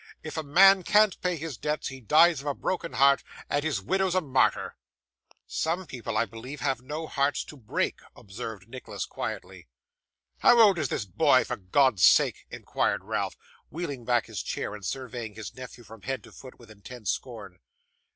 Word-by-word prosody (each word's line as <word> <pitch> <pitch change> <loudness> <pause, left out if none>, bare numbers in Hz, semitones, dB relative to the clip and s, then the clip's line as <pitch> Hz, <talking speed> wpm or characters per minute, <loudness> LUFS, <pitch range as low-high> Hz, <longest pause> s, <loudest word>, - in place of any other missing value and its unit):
If 155 - -7
a 160 - -1
man 190 +6 +6
can't 210 +2 +3
pay 180 -1 0
his 155 -5 -6
debts, 150 +5 -2
he 135 0 -10
dies 155 +5 +5
of 145 - -9
a 140 - -1
broken 175 -2 -3
heart, 140 +1 +5 0.3
and 145 0 +1
his 150 -9 -1
widow's 190 - 0
a 185 - +3
martyr.' 135 -5 +1 0.7
'Some 170 +4 -2
people, 125 -6 -5
I 115 - +2
believe, 125 +6 -9
have 135 -3 -1
no 150 +5 -5
hearts 140 -1 0
to - - -12
break,' 115 -6 -2 0.2
observed 105 -1 -8
Nicholas, 115 -5 -6
quietly. 90 -3 -6 0.7
'How 240 - +6
old 200 -6 +6
is 140 -5 -1
this 105 - -2
boy, 90 - +3
for - - -4
God's 100 +2 +2
sake?' - - +4
inquired - - -1
Ralph, - - -3 0.3
wheeling 145 -6 -5
back 120 -1 +1
his 105 -6 -5
chair, - - -4
and 105 -1 -9
surveying 120 -2 -5
his 110 -1 -8
nephew 125 -1 -10
from 110 0 -13
head 130 -2 -4
to - - -15
foot 130 - -13
with 115 -2 -16
intense 110 +1 -5
scorn. 105 -8 -7
130 Hz, 180 wpm, -27 LUFS, 110-155 Hz, 0.7 s, man